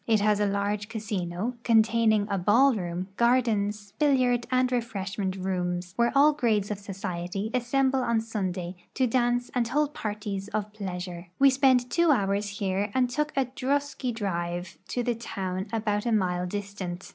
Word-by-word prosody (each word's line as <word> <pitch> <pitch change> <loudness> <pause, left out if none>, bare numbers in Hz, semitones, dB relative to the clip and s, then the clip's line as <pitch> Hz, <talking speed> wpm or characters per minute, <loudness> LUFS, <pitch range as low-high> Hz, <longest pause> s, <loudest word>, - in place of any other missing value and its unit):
It 220 -2 +4
has 210 0 +2
a 205 - +2
large 200 +1 -1
casino, 210 +1 -3
containing 220 -2 +3
a 200 -2 -1
ball 235 +9 +5
room, 180 -2 -4
gai'dens, 215 -4 +1
billiaixl 255 -5 +3
and 255 0 +2
refreshment 200 -5 -2
rooms, 180 -1 -2
where 235 +1 +2
all 295 +2 +6
grades 215 -7 +1
of 205 - -3
society 195 +1 -4
assemble 265 +2 +2
on 235 -2 +1
Sunday 190 -5 -3 0.2
to 260 - +2
dance 245 0 +1
and 245 -2 +1
hold 295 +4 0
parties 205 -2 -4
of 210 -1 -2
pleasure. 180 -3 -6
We 275 0 +6
spent 260 -2 +3
two 340 -1 +3
hours 205 -5 +2
here 200 0 -1
and 250 -1 +2
took 300 +3 -1
a 270 - +3
drosky 270 0 -2
drive 175 -5 -3
to 245 - -2
the 240 0 +1
town 190 -4 -4
about 215 -1 -1
a - - +1
mile 180 -4 +1
distant. 195 -2 -5
210 Hz, 160 wpm, -27 LUFS, 195-245 Hz, 0.2 s, all